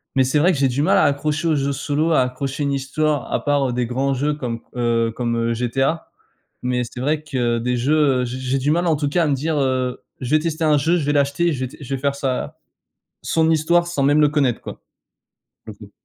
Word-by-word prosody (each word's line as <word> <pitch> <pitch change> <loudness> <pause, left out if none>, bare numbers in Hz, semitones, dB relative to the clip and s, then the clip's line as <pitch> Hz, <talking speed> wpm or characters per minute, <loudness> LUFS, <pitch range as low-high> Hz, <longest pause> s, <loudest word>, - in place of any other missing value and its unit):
mais 130 - +4
c'est 130 +4 +1
vrai 175 +5 +4
que 140 - -2
j'ai 135 - +3
du 135 +4 -1
mal 190 - +3
à - - +4
accrocher 150 +3 0
aux 155 - +2
jeux 140 0 0
solo, 150 +4 -1
à 155 - +4
accrocher 135 +3 -3
une 140 -1 0
histoire, 140 +1 -1
à - - -1
part, 140 -2 +2
heu, - - -3
des 120 -1 -1
grands 135 +3 0
jeux 145 +3 0
comme, 120 -5 -4 0.2
heu, 115 -1 +1
comme, 120 -1 -1
heu, 115 0 0
GTA, 135 +7 -1 0.5
mais 125 0 0
c'est 120 - -9
vrai 150 +3 0
que 120 -5 -1
des 125 +1 -1
jeux, 140 +6 +1 0.3
heu, - - -1
j'ai 125 +1 -5
j'ai 130 +1 -1
du 140 +3 -1
mal, 175 +2 +1
en 160 - +3
tout 145 -1 -1
cas, 170 +3 +1
à - - +1
me 145 - +2
dire, 155 +3 -2
heu: 130 -2 -1 0.2
«Je 125 - -4
vais 155 - +5
tester 160 0 -3
un 150 -1 +4
jeu, 165 +6 +2
je 150 - -2
vais 145 - +2
l'acheter, 145 +4 +1
je 130 - -5
vais 130 - -1
t - - -14
je 135 0 -4
vais - - -5
faire 140 0 +1
sa 135 -2 -3 0.7
son 160 0 +1
histoire, 170 +2 +2
sans 160 -5 -1
même 145 +2 +4
le 150 - +5
connaître», 140 -5 +1
quoi. - - -9 0.8
Pour - - -8
le - - -10
coup. - - -25
140 Hz, 260 wpm, -21 LUFS, 125-155 Hz, 0.8 s, vais